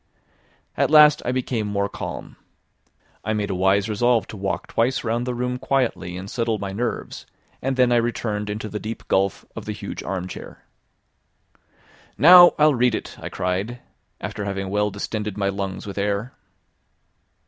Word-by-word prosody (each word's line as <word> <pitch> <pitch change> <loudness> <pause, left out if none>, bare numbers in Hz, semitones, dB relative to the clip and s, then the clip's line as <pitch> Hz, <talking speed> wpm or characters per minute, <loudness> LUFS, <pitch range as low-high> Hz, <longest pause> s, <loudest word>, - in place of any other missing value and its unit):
At - - +2
last 150 -1 +7
I 125 - +1
became 125 -4 -1
more 100 -1 0
calm. - - -7 0.9
I 110 - -1
made 105 -2 -1
a - - -1
wise 95 +2 +2
resolve 115 0 +2
to - - -7
walk 95 -1 -3
twice 120 +3 0
round 120 +1 -1
the 125 - -2
room 125 +1 -2
quietly 125 -9 -1
and 95 +2 -7
settle 115 0 -1
my 100 -1 -5
nerves, 115 +4 -4 0.3
and 135 +1 -1
then 125 -1 +3
I 120 - +4
returned 110 -3 -1
into 105 +1 -4
the 105 0 -5
deep 110 +2 -7
gulf 95 0 +1
of - - -7
the - - -3
huge - - -6
armchair. 95 -1 -6 1.5
"Now 175 - +9
I'll 150 0 +5
read 125 -2 +2
it," - - -6
I - - -6
cried, 95 +6 -2 0.4
after 105 - -5
having 95 -1 -3
well 105 +1 +1
distended 105 +1 -4
my 100 -1 +1
lungs 95 -1 -4
with 100 0 -5
air. 100 +5 -1
105 Hz, 165 wpm, -23 LUFS, 100-125 Hz, 1.5 s, Now